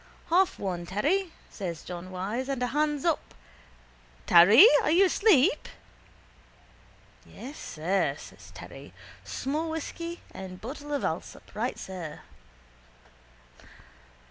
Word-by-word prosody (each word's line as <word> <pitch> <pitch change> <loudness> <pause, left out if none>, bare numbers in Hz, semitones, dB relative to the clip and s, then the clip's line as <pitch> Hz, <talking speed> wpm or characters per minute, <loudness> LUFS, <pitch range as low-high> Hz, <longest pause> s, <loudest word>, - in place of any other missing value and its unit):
—Half 370 +2 +3
one, 175 -3 -4
Terry, 325 - 0 0.2
says 170 -6 -6
John 180 +1 -7
Wyse, 205 +8 -4
and 265 -2 -2
a - - +3
hands 295 +2 -1
up. 330 -3 -1 0.9
Terry! 205 - +8 0.2
Are - - 0
you 355 +5 +5
asleep? 385 - +3 1.5
—Yes, 275 +5 -10
sir, 165 -2 -1
says 95 0 -13
Terry. 95 +5 -11 0.3
Small 275 - -3
whisky 335 +2 -5
and 185 -1 -8
bottle 290 +5 -8
of 285 - -1
Allsop. - - -5
Right, - - -2
sir. 175 -5 -7
245 Hz, 110 wpm, -28 LUFS, -, 1.5 s, Terry